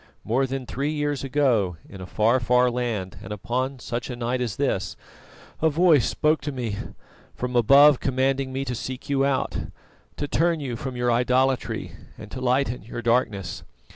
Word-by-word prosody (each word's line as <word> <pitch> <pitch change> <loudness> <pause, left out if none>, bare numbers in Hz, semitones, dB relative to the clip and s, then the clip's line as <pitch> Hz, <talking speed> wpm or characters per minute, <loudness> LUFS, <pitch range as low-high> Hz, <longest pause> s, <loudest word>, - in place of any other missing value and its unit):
More 130 +5 +1
than 135 0 -4
three 140 +4 -2
years 145 -2 -2
ago, 125 - +1
in 95 - -10
a 90 - -7
far, 115 +6 +2
far 125 +1 +3
land 115 -7 -3
and - - -8
upon 125 +6 -2
such 120 0 -5
a 125 - -4
night 120 +1 -2
as 115 -5 -2
this, 135 -9 -1 0.6
a 160 - +4
Voice 160 -4 +4
spoke 155 +1 +1
to 145 - -3
me 120 -6 -3 0.6
from 125 0 -4
above 140 +4 +7
commanding 135 0 0
me 135 +1 -3
to 125 - -3
seek 130 +3 -6
you 135 -1 +2
out, 140 -1 0 0.6
to 145 - -2
turn 165 +3 +1
you 130 -5 -4
from 130 +1 -5
your 120 0 +1
idolatry 125 +2 +1 0.3
and 105 -1 -11
to 130 - -6
lighten 125 -2 +1
your 120 +3 -7
darkness. 115 -6 0
125 Hz, 175 wpm, -24 LUFS, 120-135 Hz, 0.6 s, above